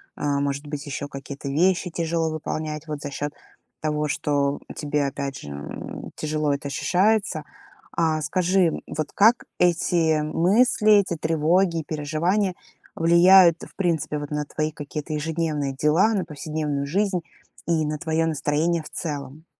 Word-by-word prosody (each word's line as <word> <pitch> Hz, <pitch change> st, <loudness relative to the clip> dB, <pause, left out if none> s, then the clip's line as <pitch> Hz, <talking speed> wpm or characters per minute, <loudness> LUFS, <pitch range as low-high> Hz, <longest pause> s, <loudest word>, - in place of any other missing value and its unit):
А, 145 Hz, -1 st, 0 dB
может 140 Hz, +1 st, -2 dB
быть, 145 Hz, 0 st, -5 dB
еще 145 Hz, 0 st, -4 dB
какие-то 140 Hz, 0 st, -8 dB
вещи 180 Hz, +5 st, +2 dB
тяжело 165 Hz, -1 st, -1 dB
выполнять 155 Hz, 0 st, -4 dB
вот 150 Hz, -1 st, -5 dB
за 145 Hz, -, -4 dB
счет 145 Hz, +1 st, -4 dB, 0.5 s
того, 150 Hz, -1 st, 0 dB
что 145 Hz, -1 st, 0 dB, 0.2 s
тебе 150 Hz, -1 st, -1 dB
опять 140 Hz, 0 st, -4 dB
же, 75 Hz, -, -9 dB
м, 70 Hz, 0 st, -7 dB
тяжело 150 Hz, -1 st, -1 dB
это 140 Hz, 0 st, -4 dB
ощущается. 185 Hz, +2 st, +1 dB, 0.5 s
А, 160 Hz, -2 st, +1 dB
скажи, 180 Hz, +1 st, +2 dB, 0.2 s
вот 155 Hz, -1 st, -4 dB
как 225 Hz, +4 st, +4 dB
эти 165 Hz, -2 st, +2 dB
мысли, 210 Hz, +8 st, +3 dB
эти 200 Hz, -4 st, +3 dB
тревоги 165 Hz, +3 st, +2 dB
и -, -, -10 dB
переживания 165 Hz, +7 st, 0 dB, 0.4 s
влияют 170 Hz, +1 st, +6 dB
в -, -, -12 dB
принципе 165 Hz, -5 st, 0 dB
вот 145 Hz, -1 st, -6 dB
на 150 Hz, 0 st, -1 dB
твои 155 Hz, +1 st, -2 dB
какие-то 150 Hz, 0 st, -6 dB
ежедневные 150 Hz, -2 st, -1 dB
дела, 155 Hz, +10 st, +3 dB
на 190 Hz, -4 st, 0 dB
повседневную 150 Hz, -2 st, -3 dB
жизнь 190 Hz, +2 st, 0 dB, 0.5 s
и 160 Hz, -2 st, +2 dB
на 150 Hz, 0 st, -2 dB
твое 160 Hz, -1 st, 0 dB
настроение 160 Hz, +2 st, 0 dB
в -, -, -10 dB
целом? 145 Hz, 0 st, -6 dB
155 Hz, 145 wpm, -24 LUFS, 145-170 Hz, 0.5 s, влияют